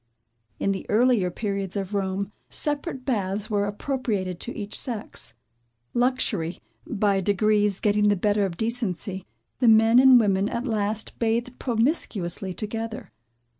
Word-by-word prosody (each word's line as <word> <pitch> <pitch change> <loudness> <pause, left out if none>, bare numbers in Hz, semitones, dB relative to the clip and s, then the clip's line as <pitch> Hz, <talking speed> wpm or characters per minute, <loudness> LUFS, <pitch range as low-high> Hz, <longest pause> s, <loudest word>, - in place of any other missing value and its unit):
In 195 - +1
the 195 - -3
earlier 225 -4 +3
periods 195 0 -3
of 195 0 -3
Rome, 195 0 -2 0.2
separate 290 -3 -2
baths 205 -4 -1
were 205 -1 +1
appropriated 205 -5 -2
to 240 - -5
each 205 -1 -2
sex. 215 - -1 0.6
Luxury, 240 -9 0 0.3
by 200 -2 +1
degrees 205 0 +2
getting 210 0 +2
the 205 - +4
better 205 +2 +1
of 170 -3 -8
decency, 205 -4 -2 0.3
the 250 - +3
men 225 +2 +6
and 260 -1 +8
women 200 -2 +2
at 235 +2 -3
last 215 -2 -2
bathed 235 +2 -1
promiscuously 225 - 0
together. 225 - -5
210 Hz, 130 wpm, -25 LUFS, 195-235 Hz, 0.6 s, and